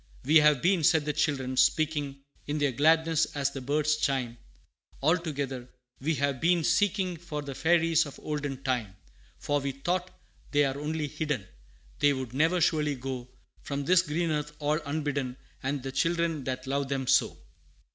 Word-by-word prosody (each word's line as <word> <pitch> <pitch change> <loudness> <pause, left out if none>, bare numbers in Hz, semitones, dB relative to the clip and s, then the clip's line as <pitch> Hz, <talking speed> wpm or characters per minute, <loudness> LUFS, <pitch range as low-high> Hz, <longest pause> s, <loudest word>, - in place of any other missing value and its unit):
"We 155 +4 +6
have 150 -3 +4
been," 180 -2 +3
said 155 -1 +4
the 150 - -1
children, 135 -4 -1
speaking 145 0 +1 0.2
In 145 +1 -1
their 145 -2 +1
gladness, 160 +4 +3
as 140 -1 0
the 135 - -6
birds 150 +3 +1
chime, 130 -5 -1 0.6
All 160 +5 +3
together, 140 -7 -4 0.3
"we 155 +4 0
have 140 -2 -1
been 170 0 +3
seeking 190 -1 +1
For 150 -3 -6
the 140 -1 -6
Fairies 165 +1 +3
of 140 - -11
olden 145 -3 -4
time; 120 -7 -1 0.4
For 145 0 0
we 140 0 -2
thought, 175 +7 -2 0.4
they 145 0 +3
are 135 +1 -2
only 150 +1 -2
hidden, 150 -8 -3 0.5
They 145 0 +4
would 130 -3 -5
never 160 +6 +2
surely 150 -3 +2
go 130 -1 -5 0.3
From 140 0 -4
this 180 +3 +5
green 165 0 -1
earth 150 -1 -2
all 150 +1 0
unbidden, 140 -4 -2 0.2
And 135 0 -2
the 135 - -4
children 165 -1 0
that 130 0 -3
love 140 0 -1
them 135 -1 -1
so. - - +3
145 Hz, 170 wpm, -28 LUFS, 135-160 Hz, 0.6 s, We